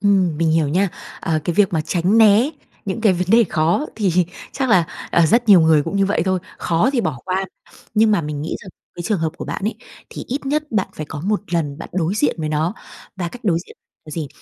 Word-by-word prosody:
Ừm, 190 -6 +2
mình 165 0 +1
hiểu 160 -2 +2
nha. 190 +6 +2 0.3
Ờ, 160 -1 0
cái 175 - -1
việc 200 -3 +3
mà 160 - +1
tránh 180 +6 +1
né 220 +5 +6 0.3
những 195 +3 -3
cái 215 -4 +4
vấn 180 0 -1
đề 230 +1 +6
khó 165 - +1
thì 200 -6 +1 0.4
chắc 265 -2 -1
là, 180 -6 +5 0.3
ờ, 170 -1 +4
rất 230 +6 +2
nhiều 190 -4 +8
người 160 -2 +4
cũng 165 +6 -3
như 195 -1 +3
vậy 200 - +1
thôi, 185 -1 +1 0.2
khó 175 +10 +1
thì 250 - +2
bỏ 150 - -2
qua. 190 +1 -1 0.5
Nhưng 220 0 +4
mà 205 - +3
mình 150 -2 -4
nghĩ 160 - -3
rằng 195 - -11 0.3
cái 175 - -6
trường 205 +1 0
hợp 160 -1 -1
của - - -6
bạn - - -5
ấy, 215 +1 -1 0.4
thì - - -7
ít 270 +2 -3
nhất 300 +2 +1
bạn 195 -3 +1
phải 155 - -6
có 150 - -6
1 205 +4 0
lần 150 -4 -1
bạn - - -8
đối 180 +1 0
diện 155 -8 +1
với 155 -1 -2
nó, 155 +6 0 0.4
và 175 -2 -3
cách 245 +6 -12
đối 170 -5 +2
diện - - -15 0.3
là 155 - -11
gì? 155 -2 -4
185 Hz, 250 wpm, -20 LUFS, 160-210 Hz, 0.5 s, nhiều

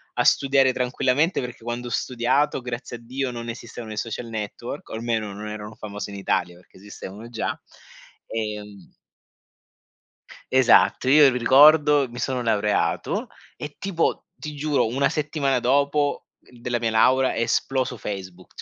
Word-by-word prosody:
a - - +2
studiare 135 -1 +4
tranquillamente 130 +6 +1
perché 125 -2 -8
quando 120 +1 -4
ho - - -7
studiato, 130 +5 0
grazie 120 0 -6
a - - -17
Dio, 130 +2 -3
non 120 -1 -6
esistevano 115 -1 -8
i - - -9
social 115 +2 -4
network, 115 +4 -6
o - - -8
almeno 110 -2 -2
non 105 +2 -7
erano 105 0 -7
famosi 105 -1 -7
in 100 - -7
Italia, 90 -2 -1
perché 90 +1 -20
esistevano 100 +2 -10
già. 115 -2 -3 0.7
Ehm 105 -3 -5 1.6
Esatto, 130 0 +4
io 145 +1 +7
ri 125 - -1
ricordo, 145 +2 +6
mi 120 - -11
sono 130 0 -1
laureato 105 -3 0 0.3
e 150 -1 -8
tipo, 180 -4 -1
ti 150 -1 -8
giuro, 145 -4 +1
1 130 +5 +1
settimana 145 -3 0
dopo, 140 +3 +1
uhm, 125 - -20
della 120 0 -1
mia 115 - 0
laurea 130 +4 +3
è - - -2
esploso 125 +2 0
Facebook, 95 -3 -8
120 Hz, 150 wpm, -24 LUFS, 110-135 Hz, 1.6 s, io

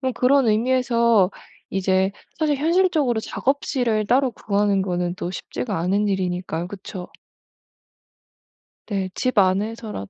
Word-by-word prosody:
그럼 260 -2 -1
그런 255 +1 +3
의미에서 235 -3 +3 0.4
이제 190 0 +1 0.3
사실 300 -3 +1
현실적으로 315 -6 +2
작업실을 245 -5 -1
따로 260 +2 +3
구하는 200 -2 0
거는 180 -2 -2
또 175 - -4
쉽지가 200 +3 -4
않은 195 +5 +1
일이니까요, 180 -3 -2
그쵸? 185 -1 -8 1.8
네 195 -3 -1
집 255 -3 -1
안에서라도 200 - 0
210 Hz, 285 characters per minute, -22 LUFS, 190-255 Hz, 1.8 s, 그런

